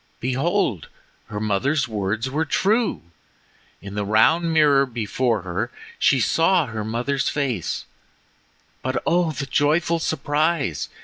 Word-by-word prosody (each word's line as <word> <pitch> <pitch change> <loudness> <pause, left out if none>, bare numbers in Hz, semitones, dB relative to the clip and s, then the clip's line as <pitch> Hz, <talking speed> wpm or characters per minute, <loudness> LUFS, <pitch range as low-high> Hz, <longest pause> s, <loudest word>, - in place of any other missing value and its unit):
Behold, 130 - -1 0.4
her 105 - -5
mother's 110 +8 0
words 105 +2 -2
were 145 +5 -1
true! 215 - +1 0.8
In 100 0 -8
the 105 0 -2
round 135 +12 +3
mirror 145 -3 +4
before 115 -2 -1
her 95 +6 -3 0.3
she 135 - +4
saw 165 - +3
her 110 -3 -5
mother's 120 +5 -1
face; 130 - -2 1.0
but, 130 0 -1
oh, 170 -1 +2
the 145 -2 -4
joyful 155 +5 +1
surprise! 155 - -1
135 Hz, 120 wpm, -22 LUFS, 110-160 Hz, 1.0 s, mirror